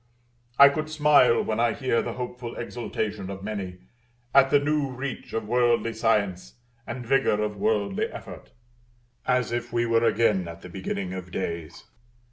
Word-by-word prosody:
I 140 0 +10
could 155 +2 -3
smile 150 -6 +4
when 110 0 -2
I 120 -1 +3
hear 130 -4 0
the - - -4
hopeful 125 -1 -6
exultation 105 -4 -4
of 95 0 -7
many, 95 -4 -5 0.5
at 135 0 +6
the 145 - +5
new 145 -1 0
reach 130 +1 -6
of 115 -1 -3
worldly 120 -1 +2
science, 105 -5 0 0.3
and 120 +1 -5
vigor 135 -4 +2
of 105 0 -3
worldly 100 -1 0
effort; - - -10 0.8
as 125 -2 +1
if 120 0 -3
we 120 0 +1
were 115 0 +2
again 105 -6 +2
at 85 0 -10
the 90 - -9
beginning 95 0 -4
of 90 -1 -7
days. 85 -4 -5
115 Hz, 160 wpm, -26 LUFS, 100-125 Hz, 0.8 s, I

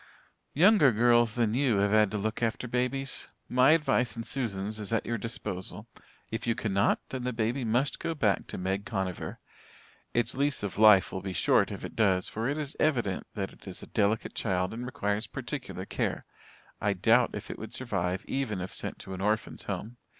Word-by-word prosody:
"Younger 180 - +6
girls 120 0 +4
than 115 -3 +1
you 125 -4 +2
have 100 0 +2
had 105 -1 +5
to 105 - -3
look 110 +3 -2
after 115 +2 -1
babies. 125 +3 -2 0.2
My 130 +4 +5
advice 125 -8 +2
and 115 -1 -5
Susan's 110 -5 -2
is 105 0 -5
at 115 - +1
your 115 -1 -2
disposal. 95 -5 -5 0.5
If 110 +1 -3
you 115 - +2
cannot, 100 -2 +1
then 130 -2 -4
the 125 - -1
baby 115 +3 -1
must 120 +5 +1
go 165 - -2
back 105 -9 +1
to - - -6
Meg 95 +2 -1
Conover. 95 -4 -3 0.7
Its 120 -1 +1
lease 140 -3 0
of 100 0 -4
life 105 -3 +7
will 95 - -4
be 95 0 -4
short - - +3
if - - -6
it - - -8
does 95 -4 +2
for 115 +4 -2
it 145 - -1
is 150 -2 -4
evident 120 -11 +1
that 95 -2 -3
it - - -18
is 95 - -8
a - - -9
delicate 110 +1 +1
child 90 -3 -1
and 120 +2 -5
requires 105 -3 -1
particular - - -5
care. - - -2 0.6
I - - +2
doubt - - +3
if - - -6
it - - -8
would - - -7
survive 95 -7 -2
even 130 -8 -2
if 90 +1 -5
sent - - -3
to 95 - -8
an 95 - -5
orphans' 105 +2 -1
home. 120 +3 -5
110 Hz, 200 wpm, -29 LUFS, 100-125 Hz, 0.7 s, life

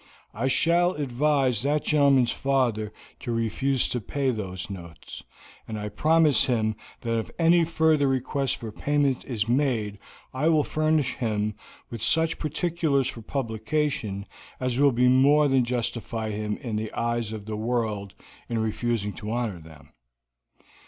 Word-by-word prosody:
I 115 +5 -1
shall 170 +6 +3
advise 135 - +1
that 145 +3 +1
gentleman's 140 -5 +4
father 120 -6 0 0.3
to 120 - -4
refuse 115 +4 0
to 125 - -2
pay 135 +5 -1
those 95 -5 -5
notes, 85 -5 -9 0.4
and 105 -2 -5
promise 160 -2 +4
him 110 -3 0 0.3
that 115 -1 0
if 110 - -5
any 170 0 +4
further 160 -3 +2
request 135 0 0
for 115 -2 -7
payment 140 +2 0
is 115 -4 -2
made 120 -6 0 0.3
I 140 +5 +1
will 155 -2 +4
furnish 155 -4 0
him 105 -3 -1 0.4
with 115 -2 -6
such 160 +7 +1
particulars 155 -4 0
for 115 - -8
publication 110 -3 -2 0.3
as 130 -1 -1
will 140 -1 +5
more 130 +5 +4
than 135 -2 +3
justify 115 -2 -2
him 105 0 -3
in 115 -6 -4
the 110 0 -3
eyes 115 -2 -1
of 110 -2 -7
the 110 0 -4
world 110 -3 -2 0.3
in 115 - -1
refusing 110 -1 -1
to 105 - -7
honor 115 -6 -2
them. 80 -3 -15
125 Hz, 145 wpm, -26 LUFS, 110-145 Hz, 0.4 s, will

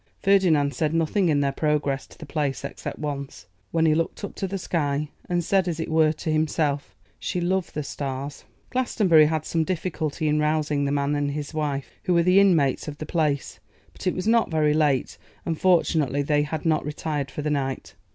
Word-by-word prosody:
Ferdinand 175 -8 +3
said 160 -1 0
nothing 165 +3 +2
in 145 -2 +3
their 140 -1 +1
progress 145 -2 0
to - - -17
the 160 - -9
Place 140 -2 -2
except - - -6
once, 140 -7 -5 0.2
when 165 -1 +1
he 155 - +4
looked 165 +5 -2
up 200 - -5
to 195 - -3
the 195 +1 -3
sky, 150 -5 -1 0.2
and 175 -1 +1
said, 190 +1 +2
as 165 -2 -2
it 160 - -3
were 160 -1 +4
to 155 +1 -4
himself, 155 -2 0 0.2
'She 180 - -2
loved 180 +1 -1
the 150 - -2
stars.' 140 0 -5 0.3
Glastonbury 195 -11 +4
had 155 -1 -1
some 165 -1 0
difficulty 160 -3 -2
in 150 0 +2
rousing 150 -1 +1
the 140 - 0
man 140 0 0
and 145 -1 0
his 150 +1 -5
wife, 145 -3 -2
who 180 - +2
were 170 - +4
the 180 +3 +5
inmates 165 -10 +3
of 145 -1 -6
the 155 - -6
Place; 150 -4 -1 0.3
but - - -6
it 180 - +1
was 185 - -3
not 230 0 +3
very 155 -2 +2
late, 150 -4 +1 0.3
and, 165 -2 -3
fortunately, 160 -6 +2
they 145 +1 +2
had 150 +2 -3
not 155 -2 +2
retired 150 -1 -3
for 150 - -5
the 150 - 0
night. 135 -2 -2
155 Hz, 205 wpm, -25 LUFS, 145-170 Hz, 0.3 s, the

